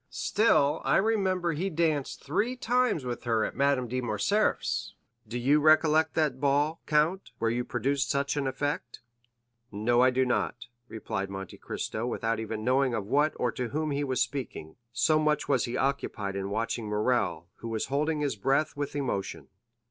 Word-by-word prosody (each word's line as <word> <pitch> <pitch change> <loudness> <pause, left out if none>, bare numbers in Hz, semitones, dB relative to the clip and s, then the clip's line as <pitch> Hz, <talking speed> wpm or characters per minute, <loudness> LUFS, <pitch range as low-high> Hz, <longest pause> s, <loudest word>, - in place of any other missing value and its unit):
Still 150 -10 +2
I - - +3
remember 190 -4 +1
he 180 +6 -2
danced 155 -5 -1
three 215 - 0
times 245 - +1
with 120 -1 -4
her 115 -2 +2
at - - -5
Madame 140 -2 +2
de 130 +2 -2
Morcerf's. 120 - 0 0.3
Do 120 +3 -4
you 140 +5 +3
recollect 155 +1 +4
that 150 -5 +1
ball, 145 +3 +1
count, 160 +5 +1
where 115 0 0
you 120 +1 -1
produced 135 +2 -1
such 140 0 0
an 140 -2 -1
effect?" 135 -1 -3 0.7
50121m 105 0 -6
"No, 120 +1 +4
I 130 - +6
do 130 +1 +1
not," 125 0 -1 0.2
replied 100 -4 -4
Monte 95 -1 -7
Cristo, 115 +2 -4
without 115 -2 -1
even 110 -1 -4
knowing 130 0 +2
of 105 - -3
what 145 +7 +2
or 125 - 0
to 125 0 -3
whom 155 +2 -2
he 140 +1 -1
was 130 -2 -1
speaking, 125 - -4 0.2
so 125 +6 +3
much 150 -1 +1
was - - +2
he 125 +1 -3
occupied 125 -7 -2
in 100 0 -3
watching 110 +1 -2
Morrel, 105 -6 0
who 115 - -8
was 110 -1 -2
holding 150 +2 0
his 145 -5 0
breath 135 +9 +1
with 145 0 -4
emotion. 125 -9 -3
135 Hz, 180 wpm, -28 LUFS, 115-150 Hz, 0.7 s, I